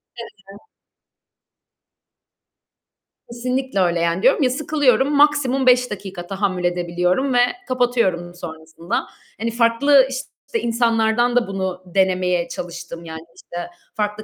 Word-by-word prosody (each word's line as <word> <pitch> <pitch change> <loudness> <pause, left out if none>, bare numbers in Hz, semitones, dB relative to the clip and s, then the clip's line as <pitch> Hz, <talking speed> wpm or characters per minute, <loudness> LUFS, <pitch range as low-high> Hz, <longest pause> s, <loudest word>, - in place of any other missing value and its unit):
He 235 - -7 0.3
he. 200 - -12 2.7
Kesinlikle 250 -1 -2
öyle 175 -2 +2
yani 170 +2 0
diyorum 265 +3 +4
ya 255 - +3
sıkılıyorum, 280 -1 +1
maksimum 285 -3 +3
5 250 -1 +4
dakika 190 -3 -7
tahammül 195 -2 -2
edebiliyorum 180 +8 0
ve - - +2 0.3
kapatıyorum 235 -9 0
sonrasında. 160 -1 -5 0.3
Hani 230 +2 -2
farklı 250 +4 +4
işte 275 - -5
insanlardan 230 0 +1
da 245 -1 +2
bunu 190 -1 -4
denemeye 180 -2 +1
çalıştım, 170 -1 -7
yani 160 -1 -7
işte 175 - -10 0.4
farklı 210 -1 -2
215 Hz, 115 wpm, -20 LUFS, 175-250 Hz, 2.7 s, diyorum